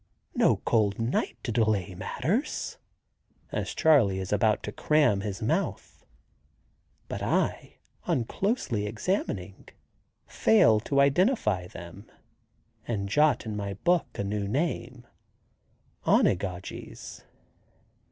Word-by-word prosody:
no -, -, +3 dB
cold 105 Hz, -3 st, +2 dB
night 115 Hz, +3 st, -1 dB
to 120 Hz, -, -2 dB
delay 110 Hz, -5 st, +1 dB
matters!" 160 Hz, -, -2 dB, 0.7 s
as -, -, -3 dB
Charley 130 Hz, -12 st, +4 dB
is 95 Hz, +1 st, -3 dB
about 105 Hz, +1 st, +2 dB
to 105 Hz, -, -4 dB
cram 145 Hz, -10 st, +2 dB
his 105 Hz, +2 st, -5 dB
mouth. 110 Hz, -, -2 dB, 1.0 s
But -, -, -5 dB
I, -, -, -1 dB, 0.3 s
on 120 Hz, -, +1 dB
closely 130 Hz, -, -1 dB
examining, 105 Hz, -, -3 dB, 0.6 s
fail 110 Hz, 0 st, +4 dB
to 140 Hz, +5 st, 0 dB
identify 140 Hz, -, +2 dB
them, 85 Hz, +2 st, -11 dB, 0.8 s
and 100 Hz, -4 st, -2 dB
jot 150 Hz, +2 st, +3 dB
in 110 Hz, -1 st, -4 dB
my 100 Hz, -1 st, -4 dB
book 175 Hz, -, +1 dB
a -, -, -2 dB
new 100 Hz, 0 st, -2 dB
name, 125 Hz, -1 st, -2 dB, 1.0 s
"Onigogies." 90 Hz, -1 st, -1 dB
110 Hz, 105 wpm, -27 LUFS, 100-140 Hz, 1.0 s, Charley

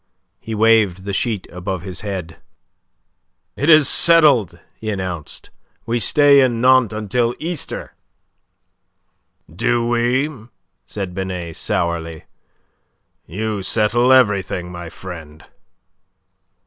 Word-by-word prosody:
He 115 Hz, -, -6 dB
waved 105 Hz, -4 st, +2 dB
the 100 Hz, 0 st, -5 dB
sheet 105 Hz, -1 st, -2 dB
above 90 Hz, 0 st, -5 dB
his 95 Hz, -2 st, -5 dB
head. 95 Hz, -5 st, -6 dB, 1.2 s
"It 145 Hz, -, -1 dB
is 155 Hz, -3 st, +7 dB
settled," 140 Hz, -, +5 dB, 0.2 s
he 110 Hz, -, -7 dB
announced, 90 Hz, -6 st, -6 dB, 0.3 s
"we 120 Hz, +1 st, -1 dB
stay 145 Hz, +3 st, +4 dB
in 120 Hz, -3 st, +1 dB
Nantes 130 Hz, -2 st, +4 dB
until 115 Hz, +3 st, -1 dB
Easter." 165 Hz, 0 st, -3 dB, 1.6 s
"Do 120 Hz, +6 st, 0 dB
we?" 120 Hz, +1 st, -1 dB, 0.4 s
said 95 Hz, -4 st, -6 dB
Binet, 90 Hz, -3 st, -5 dB
sourly. 85 Hz, -2 st, -3 dB, 1.0 s
"You 105 Hz, +4 st, -4 dB
settle 115 Hz, +5 st, +1 dB
everything, 100 Hz, -8 st, +1 dB
my 85 Hz, -1 st, -8 dB
friend." 80 Hz, -4 st, -11 dB
105 Hz, 100 wpm, -18 LUFS, 90-120 Hz, 1.6 s, is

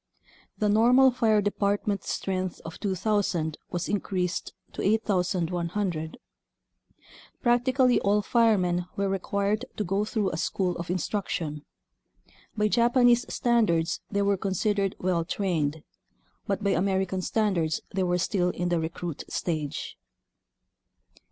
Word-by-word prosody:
The 210 Hz, -, +1 dB
normal 245 Hz, +5 st, +5 dB
fire 220 Hz, -4 st, +2 dB
department 205 Hz, 0 st, 0 dB
strength 185 Hz, -1 st, -2 dB
of 165 Hz, -, -8 dB
2,000 190 Hz, -5 st, -1 dB
was 175 Hz, 0 st, -3 dB
increased 185 Hz, -3 st, -2 dB, 0.2 s
to -, -, -5 dB
8,100. 180 Hz, -4 st, 0 dB, 1.3 s
Practically 250 Hz, +1 st, +3 dB
all 205 Hz, +1 st, +2 dB
firemen 185 Hz, -7 st, +2 dB
were 200 Hz, 0 st, 0 dB
required 200 Hz, +4 st, -1 dB
to 210 Hz, -, 0 dB
go 195 Hz, +2 st, 0 dB
through 210 Hz, -2 st, -1 dB
a 155 Hz, -, -4 dB
school 180 Hz, +1 st, -1 dB
of 170 Hz, 0 st, -6 dB
instruction. 170 Hz, -4 st, -2 dB, 0.9 s
By 210 Hz, 0 st, +3 dB
Japanese 240 Hz, +2 st, +3 dB
standards 210 Hz, -9 st, +1 dB
they 200 Hz, -1 st, 0 dB
were 200 Hz, 0 st, +2 dB
considered 195 Hz, +1 st, 0 dB
well 180 Hz, -2 st, 0 dB
trained, 160 Hz, -5 st, -1 dB, 0.6 s
but 200 Hz, 0 st, -1 dB
by 200 Hz, -, +2 dB
American 190 Hz, 0 st, 0 dB
standards 180 Hz, -6 st, 0 dB
they 190 Hz, -, 0 dB
were 180 Hz, -1 st, +1 dB
still 180 Hz, 0 st, +1 dB
in 175 Hz, 0 st, -2 dB
the 175 Hz, -1 st, +1 dB
recruit 165 Hz, 0 st, -4 dB
stage. 155 Hz, -5 st, -3 dB
195 Hz, 120 wpm, -27 LUFS, 175-210 Hz, 1.3 s, normal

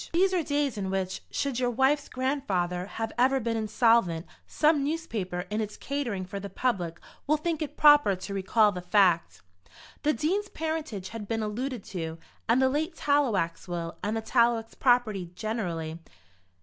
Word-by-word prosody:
These 375 Hz, +3 st, +3 dB
are 360 Hz, -, +2 dB
days 285 Hz, -6 st, -1 dB
in 190 Hz, -1 st, -2 dB
which, 190 Hz, -1 st, -2 dB
should 275 Hz, -3 st, -2 dB
your 250 Hz, -1 st, +1 dB
wife's 265 Hz, +4 st, +2 dB
grandfather 195 Hz, -10 st, -1 dB
have 225 Hz, +1 st, -4 dB
ever 265 Hz, +2 st, +4 dB
been 230 Hz, -1 st, -1 dB
insolvent, 215 Hz, -6 st, +2 dB, 0.2 s
some 300 Hz, -2 st, +3 dB
newspaper, 230 Hz, -, -2 dB
in 215 Hz, +1 st, 0 dB
its 210 Hz, -1 st, -5 dB
catering 240 Hz, -9 st, -3 dB
for 195 Hz, +2 st, -6 dB
the 200 Hz, +1 st, -6 dB
public, 180 Hz, -11 st, -1 dB, 0.3 s
will 305 Hz, +2 st, +3 dB
think 320 Hz, 0 st, -2 dB
it 300 Hz, -1 st, -4 dB
proper 295 Hz, -9 st, +6 dB
to 185 Hz, +2 st, -7 dB
recall 205 Hz, +2 st, +3 dB
the 180 Hz, -2 st, -5 dB
fact. 180 Hz, -2 st, +2 dB, 0.6 s
The 300 Hz, -, +3 dB
Dean's 385 Hz, -, -1 dB
parentage 315 Hz, -12 st, -4 dB
had 225 Hz, -3 st, -7 dB
been 225 Hz, 0 st, -1 dB
alluded 240 Hz, +2 st, -3 dB
to, 165 Hz, -3 st, -5 dB, 0.3 s
and 235 Hz, +3 st, +5 dB
the 265 Hz, -, +4 dB
late 315 Hz, +5 st, -1 dB
Tallowax 250 Hz, -, +1 dB
will, 170 Hz, -1 st, -4 dB
and 210 Hz, +3 st, -1 dB
the -, -, -2 dB
Tallowax 230 Hz, 0 st, +2 dB
property 230 Hz, -8 st, +2 dB
generally. 175 Hz, -7 st, -3 dB
225 Hz, 165 wpm, -28 LUFS, 190-280 Hz, 0.6 s, proper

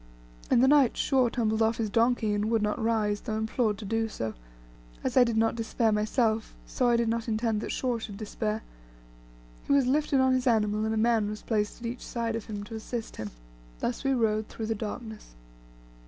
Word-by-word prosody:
In 235 Hz, -, +5 dB
the 260 Hz, -, +5 dB
night 280 Hz, -4 st, +5 dB
Shaw 260 Hz, -3 st, +3 dB
tumbled 220 Hz, -2 st, 0 dB
off 225 Hz, +1 st, +2 dB
his 220 Hz, -3 st, -2 dB
donkey, 230 Hz, -1 st, +2 dB
and 205 Hz, +1 st, 0 dB
would 225 Hz, -2 st, +2 dB
not 210 Hz, +3 st, -1 dB
rise, 215 Hz, -2 st, +1 dB
though 220 Hz, -3 st, -3 dB
implored 220 Hz, -1 st, 0 dB
to 215 Hz, -, -8 dB
do 225 Hz, +2 st, 0 dB
so. 110 Hz, -, -4 dB, 0.7 s
As -, -, -1 dB
I 255 Hz, -, +8 dB
did 235 Hz, -2 st, 0 dB
not 225 Hz, 0 st, +3 dB
despair 225 Hz, 0 st, 0 dB
myself, 220 Hz, +1 st, 0 dB
so 250 Hz, -1 st, +1 dB
I 235 Hz, -, +4 dB
did 235 Hz, 0 st, +1 dB
not 230 Hz, +1 st, -1 dB
intend 220 Hz, -1 st, 0 dB
that -, -, -4 dB
Shaw 245 Hz, -3 st, -1 dB
should 205 Hz, -3 st, -7 dB
despair. 215 Hz, 0 st, -3 dB, 1.0 s
He -, -, -1 dB
was 280 Hz, -2 st, +4 dB
lifted 280 Hz, +1 st, +2 dB
on 260 Hz, 0 st, +4 dB
his 255 Hz, 0 st, 0 dB
animal, 215 Hz, -2 st, +2 dB
and 220 Hz, -, 0 dB
a -, -, -1 dB
man 225 Hz, -2 st, +2 dB
was 210 Hz, 0 st, -6 dB
placed 215 Hz, +1 st, -1 dB
on -, -, -2 dB
each 240 Hz, +2 st, -6 dB
side 230 Hz, -1 st, -2 dB
of 225 Hz, -, -4 dB
him 205 Hz, -2 st, -5 dB
to 225 Hz, -, -10 dB
assist 225 Hz, +1 st, -5 dB
him; 110 Hz, -1 st, -4 dB, 0.5 s
thus 240 Hz, +2 st, -2 dB
we 270 Hz, -1 st, +2 dB
rode 215 Hz, -2 st, +1 dB
through 225 Hz, -, -6 dB
the 225 Hz, -, 0 dB
darkness. 220 Hz, -, -7 dB
225 Hz, 215 wpm, -28 LUFS, 215-240 Hz, 1.0 s, I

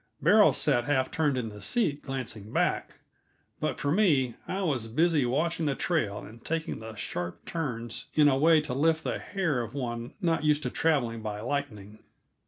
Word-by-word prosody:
Beryl -, -, +6 dB
sat 120 Hz, -, +1 dB
half 130 Hz, -2 st, +1 dB
turned 150 Hz, -4 st, +1 dB
in 115 Hz, -3 st, -2 dB
the 105 Hz, -1 st, -11 dB
seat, 160 Hz, -12 st, 0 dB
glancing 125 Hz, -6 st, -6 dB
back; -, -, 0 dB, 0.7 s
but -, -, -2 dB
for 140 Hz, -, 0 dB
me, 150 Hz, -, +3 dB
I 195 Hz, +1 st, -2 dB
was 130 Hz, -10 st, 0 dB
busy 150 Hz, +2 st, +2 dB
watching 160 Hz, +5 st, 0 dB
the 140 Hz, -, 0 dB
trail 120 Hz, -, 0 dB
and 115 Hz, +2 st, -13 dB
taking 165 Hz, 0 st, -3 dB
the 110 Hz, 0 st, -8 dB
sharp 90 Hz, -4 st, -5 dB
turns 120 Hz, -8 st, -4 dB
in 150 Hz, -1 st, +6 dB
a 135 Hz, -, +4 dB
way 155 Hz, +3 st, +5 dB
to 150 Hz, -4 st, -5 dB
lift 160 Hz, +4 st, +2 dB
the -, -, -2 dB
hair 165 Hz, -10 st, -1 dB
of 115 Hz, +2 st, -7 dB
one 120 Hz, -3 st, -4 dB
not 165 Hz, -5 st, +1 dB
used 150 Hz, 0 st, +2 dB
to -, -, -2 dB
traveling 120 Hz, -8 st, +1 dB
by 105 Hz, -1 st, -4 dB
lightning. 110 Hz, -6 st, -4 dB
135 Hz, 185 wpm, -28 LUFS, 115-160 Hz, 0.7 s, Beryl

